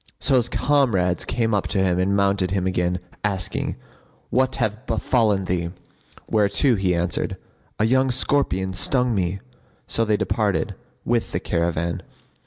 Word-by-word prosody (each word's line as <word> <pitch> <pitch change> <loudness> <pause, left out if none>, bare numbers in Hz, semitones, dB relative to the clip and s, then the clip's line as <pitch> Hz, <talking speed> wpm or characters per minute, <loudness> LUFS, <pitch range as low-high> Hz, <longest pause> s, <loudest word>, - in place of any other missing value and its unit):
So - - +1
his 120 - +1
comrades 110 -12 +1
came 115 -2 0
up 100 - +1
to - - -2
him 90 -2 +2
and 95 +2 +1
mounted 100 -2 +2
him 95 -1 -1
again, 90 -1 0 0.2
asking, 95 -4 -1 0.6
"What 130 +1 +2
hath 110 0 -2
befallen 110 -3 +1
thee?" 85 -2 -1 0.6
whereto 110 +5 +3
he 95 -4 +1
answered, 85 0 -1 0.4
"A 110 - +2
young 130 +3 +3
scorpion[FN#51] 125 -8 +1
stung 125 +5 +2
me." 95 -1 -1 0.4
So 115 - +2
they 105 -2 +1
departed, 105 -3 0 0.3
with 120 -1 0
the - - 0
caravan. 85 0 -1
100 Hz, 145 wpm, -23 LUFS, 90-115 Hz, 0.6 s, whereto